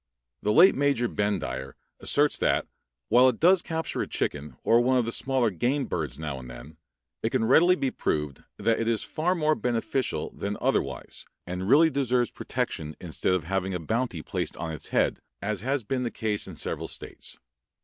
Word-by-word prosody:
The 105 - +1
late 175 - +7
Major 140 -3 +1
Bendire 70 - -2 0.2
asserts 145 +1 +2
that, - - +2 0.4
while 125 +3 +7
it 120 - -3
does 180 +2 +5
capture 160 -1 -3
a - - -2
chicken 75 +1 -3
or 115 +1 +5
one 130 +1 +3
of 120 - +2
the 115 - -2
smaller 130 -3 +1
game 130 - 0
birds 75 -7 -3
now 75 -4 -4
and 65 -1 -10
then, 60 +6 -11 0.4
it - - 0
can 115 - +1
readily 175 +9 +6
be 135 -7 -1
proved 75 -3 -2
that 115 +2 +1
it 115 - -1
is 115 -2 +1
far 175 +4 0
more 155 -2 +2
beneficial 125 0 -1
than 100 +1 -4
otherwise - - -2 0.2
and 90 +2 -4
really 160 +5 +6
deserves 125 -3 +1
protection 75 -1 -3
instead 90 +1 -1
of 90 - -1
having 95 +2 -1
a - - -2
bounty 110 -1 -2
placed - - -4
on 80 - -4
its 75 - -6
head, - - +1 0.2
as 100 -1 -2
has 135 +2 -1
been 130 +4 -2
the 120 - -1
case 105 -3 -2
in - - -8
several - - -3
states. - - -8
115 Hz, 190 wpm, -27 LUFS, 90-135 Hz, 0.4 s, late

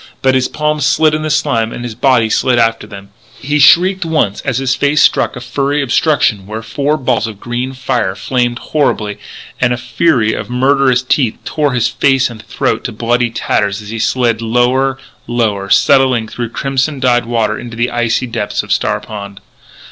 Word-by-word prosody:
But 130 0 +3
his 130 -1 +2
palms 150 -1 -1
slid 155 0 +3
in 155 - -1
the 155 - -3
slime 115 -7 0
and 120 - -7
his 120 -2 -5
body 125 -1 +2
slid 125 +3 +1
after. 115 -2 0 0.5
He 145 +2 -1
shrieked 185 +7 +5
once 155 -12 0
as 130 -4 -2
his 130 -1 0
face 145 +2 +1
struck - - +3
a 125 - -7
furry 140 +4 -1
obstruction 120 - +1
where 110 +2 -6
four 145 +5 -1
balls 125 -4 0
of 105 -3 -9
green 120 +3 -4
fire 125 -7 -2
flamed 120 0 -1 0.2
horribly 110 -9 0 0.4
and 125 -1 +2
a - - -3
fury 120 -2 +1
of - - -5
murderous 130 0 +2
teeth 125 -3 0
tore 150 -3 -1
his 120 -2 +1
face 135 -2 +1
and 110 -2 -10
throat - - -2
to - - -3
bloody 120 +2 0
tatters 105 -3 -1
as 105 -1 -10
he 115 +1 -5
slid 115 -1 0
lower, 125 +4 +1 0.3
lower, 105 -5 -1
settling 125 +3 +3
through 120 +1 -5
crimson 135 +3 -2
dyed 120 -2 +2
waters 110 -3 -1
into 115 -1 -9
the 120 +1 0
icy 120 +1 0
depths 110 -4 -3
of - - -1
Star - - 0
Pond. 100 -2 -9
125 Hz, 185 wpm, -14 LUFS, 115-135 Hz, 0.5 s, shrieked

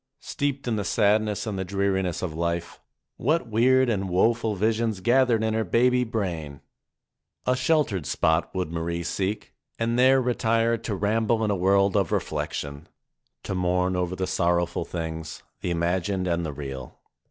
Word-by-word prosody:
Steeped 140 -2 -3
in 115 -2 0
the 105 - -1
sadness 105 +1 +1
and 105 -3 -3
the - - -1
dreariness 95 -2 -1
of 85 -4 -3
life, 85 +1 -3 0.4
what 155 +1 +1
weird 130 +4 +4
and 100 -5 -1
woe 95 +6 +4
ful 115 -2 -3
visions 110 +1 0
gathered 120 +1 +3
in 110 0 0
her 110 0 +1
baby 125 +5 +3
brain! 85 - -3 0.9
A 125 - +2
sheltered 130 - +1
spot 80 +3 +1
would 90 -3 -2
Marie 85 +1 -3
seek 95 +4 -3 0.2
and 115 +1 0
there 130 +1 +6
retire 115 -2 +1
to 115 -2 -4
ramble 110 +3 +1
in 105 - +1
a - - +1
world 100 +2 +3
of 100 -6 +1
reflection, 70 +1 -3 0.6
to - - -4
mourn 90 0 +1
over 90 0 -1
the 95 - -2
sorrowful 85 -1 0
things, 80 -1 -5 0.2
the - - -3
imagined 90 +3 0
and 85 -1 0
the - - -3
real. 65 -3 -7
100 Hz, 165 wpm, -25 LUFS, 85-115 Hz, 0.9 s, there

